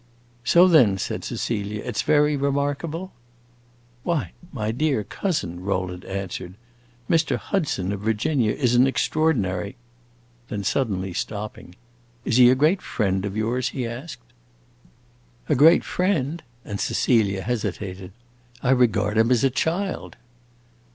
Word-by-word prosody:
"So 175 Hz, +7 st, +6 dB
then," 125 Hz, -, +5 dB
said -, -, -4 dB
Cecilia, 105 Hz, -2 st, -3 dB
"it -, -, -4 dB
's -, -, +1 dB
very 150 Hz, 0 st, +3 dB
remarkable?" 145 Hz, +5 st, -2 dB, 0.9 s
"Why, 145 Hz, -, -1 dB, 0.2 s
my 110 Hz, -4 st, -2 dB
dear 135 Hz, -2 st, 0 dB
cousin," 100 Hz, -, -3 dB
Rowland 90 Hz, -1 st, -3 dB
answered, 95 Hz, -2 st, -5 dB, 0.5 s
"Mr. 165 Hz, -1 st, +2 dB
Hudson, 140 Hz, -, -2 dB
of 100 Hz, -, -3 dB
Virginia, 110 Hz, +3 st, +1 dB
is 125 Hz, -1 st, +1 dB
an 125 Hz, +2 st, +5 dB
extraordinary 130 Hz, -, 0 dB, 0.4 s
" -, -, -34 dB
Then 105 Hz, -1 st, -3 dB
suddenly 95 Hz, -7 st, -1 dB
stopping: 105 Hz, -2 st, -5 dB, 0.5 s
"Is 120 Hz, -, +1 dB
he 125 Hz, -1 st, +8 dB
a 130 Hz, -, +5 dB
great 155 Hz, +8 st, +2 dB
friend 95 Hz, -3 st, -1 dB
of 100 Hz, +1 st, -4 dB
yours?" 120 Hz, +3 st, 0 dB
he 125 Hz, -, -1 dB
asked. 120 Hz, -, -7 dB, 1.2 s
"A -, -, +2 dB
great 160 Hz, +6 st, +6 dB
friend?" 170 Hz, -4 st, -1 dB, 0.2 s
and 100 Hz, -2 st, -5 dB
Cecilia 100 Hz, -6 st, +1 dB
hesitated. 100 Hz, -5 st, -4 dB, 0.5 s
"I 130 Hz, -, +3 dB
regard 110 Hz, -4 st, +2 dB
him 115 Hz, +1 st, +4 dB
as 125 Hz, -3 st, +3 dB
a 135 Hz, -, +3 dB
child!" 180 Hz, +8 st, -2 dB
115 Hz, 130 wpm, -23 LUFS, 100-145 Hz, 1.2 s, he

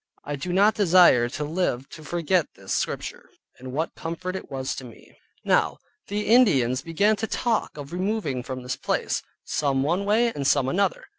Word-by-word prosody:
I 145 Hz, -, -4 dB
do 160 Hz, +6 st, -4 dB
not 200 Hz, +4 st, +4 dB
desire 175 Hz, -, +5 dB
to 145 Hz, +4 st, -4 dB
live 150 Hz, -5 st, -1 dB
to 155 Hz, -, -11 dB
forget 170 Hz, +1 st, +1 dB
this -, -, -5 dB
Scripture, -, -, -3 dB, 0.3 s
and 130 Hz, 0 st, -8 dB
what 155 Hz, +5 st, -2 dB
comfort 170 Hz, +3 st, -5 dB
it 190 Hz, -, -7 dB
was 130 Hz, -2 st, -3 dB
to -, -, -6 dB
me. 120 Hz, -3 st, -14 dB, 0.3 s
Now -, -, +2 dB, 0.3 s
the 210 Hz, +1 st, -2 dB
Ind. 135 Hz, -, +4 dB
began 200 Hz, +6 st, +2 dB
to 220 Hz, -, -2 dB
talk 230 Hz, -9 st, -1 dB
of 145 Hz, +2 st, -8 dB
removing 185 Hz, -, -1 dB
from 130 Hz, 0 st, -6 dB
this 125 Hz, 0 st, -3 dB
place, -, -, -1 dB, 0.2 s
some 135 Hz, -2 st, 0 dB
one 175 Hz, +7 st, 0 dB
way, 225 Hz, +3 st, +2 dB
and 140 Hz, -2 st, -2 dB
some 130 Hz, -, +3 dB
another. 200 Hz, -, 0 dB
165 Hz, 180 wpm, -25 LUFS, 135-200 Hz, 0.3 s, desire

